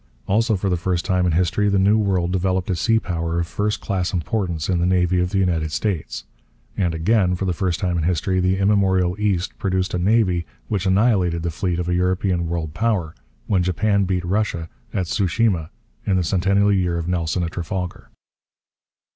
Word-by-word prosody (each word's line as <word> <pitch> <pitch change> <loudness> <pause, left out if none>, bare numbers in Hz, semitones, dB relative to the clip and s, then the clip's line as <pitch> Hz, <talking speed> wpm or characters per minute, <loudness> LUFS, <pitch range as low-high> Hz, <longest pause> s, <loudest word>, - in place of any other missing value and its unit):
Also 110 +3 +2
for 95 +1 -2
the 90 -2 +1
first 85 0 -1
time 90 -1 +1
in - - +2
history 90 +4 +1
the 100 - +2
New 100 +3 +4
World 95 -5 +1
developed 95 0 0
a - - 0
sea 115 +7 +2
power 85 -5 -2
of 85 - 0
first 105 +5 -2
class 95 -3 -2
importance 90 -3 -2
in 90 -2 +1
the 85 - +1
navy 90 -1 +2
of 90 0 +1
the 95 - -2
United 85 -5 0
States. 90 -2 -2 0.5
And, 85 -4 0
again 90 +2 +2
for 95 - -3
the 90 - 0
first 85 -1 -1
time 90 -3 0
in - - -1
history, 90 +2 0
the 95 +1 +1
immemorial 95 -2 +2
East 100 -4 -1
produced 95 -1 -1
a 90 - 0
navy 95 -3 +2 0.2
which 100 -3 -1
annihilated 95 -4 +2
the 85 - -1
fleet 90 +1 -2
of 90 -1 -2
a 90 - 0
European 90 -1 0
world 80 -3 -3
power 100 -7 -1 0.3
when 95 -3 +1
Japan 100 +3 +1
beat 90 -1 -1
Russia 90 -4 -1 0.2
at 95 -3 -1
Tsu 95 +3 0
shima 90 -4 +1 0.3
in 95 - +1
the 90 - +2
centennial 100 +3 +2
year 90 -3 +1
of 85 0 -4
Nelson 90 0 -1
at 85 - -3
Trafalgar. 90 +1 -5
90 Hz, 195 wpm, -21 LUFS, 85-100 Hz, 0.5 s, New